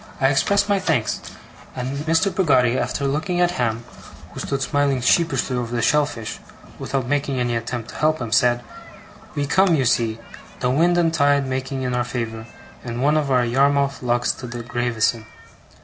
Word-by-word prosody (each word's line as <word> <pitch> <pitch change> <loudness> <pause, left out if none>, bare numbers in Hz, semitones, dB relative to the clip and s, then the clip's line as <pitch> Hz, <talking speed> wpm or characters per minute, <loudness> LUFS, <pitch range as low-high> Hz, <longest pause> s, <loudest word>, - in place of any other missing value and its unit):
I 135 - +4
expressed 200 +10 +2
my 200 -1 +2
thanks; 155 - 0 0.5
and 130 +2 -3
Mr. 165 +4 +2
Peggotty, 130 -10 +3
after 125 +3 -1
looking 155 +6 -1
at 175 0 +3
Ham, 120 -7 -1 0.5
who - - -8
stood 135 -1 -2
smiling 140 -1 +1
sheepishly 135 +1 +1
over 120 -1 -3
the 115 - 0
shellfish, 145 -6 0 0.4
without 135 -3 -2
making 140 0 -1
any 120 -1 0
attempt 115 0 -4
to - - -9
help 155 +1 +1
him, 120 -3 -5
said: 120 +1 +3 0.7
'We 145 -1 0
come, 185 +3 +3
you 135 -4 +1
see, 115 -1 +1 0.4
the 125 - 0
wind 170 +6 +3
and 165 -2 +2
tide 145 -2 +3
making 130 0 -3
in 125 -1 -2
our 125 0 +1
favour, 115 -2 -5 0.4
in 120 0 -4
one 150 +3 +3
of 150 -2 0
our 125 -2 +3
Yarmouth 140 +2 +2
lugs 120 -1 +1
to 125 - -8
Gravesen'. 120 -1 -1
130 Hz, 175 wpm, -22 LUFS, 120-145 Hz, 0.7 s, I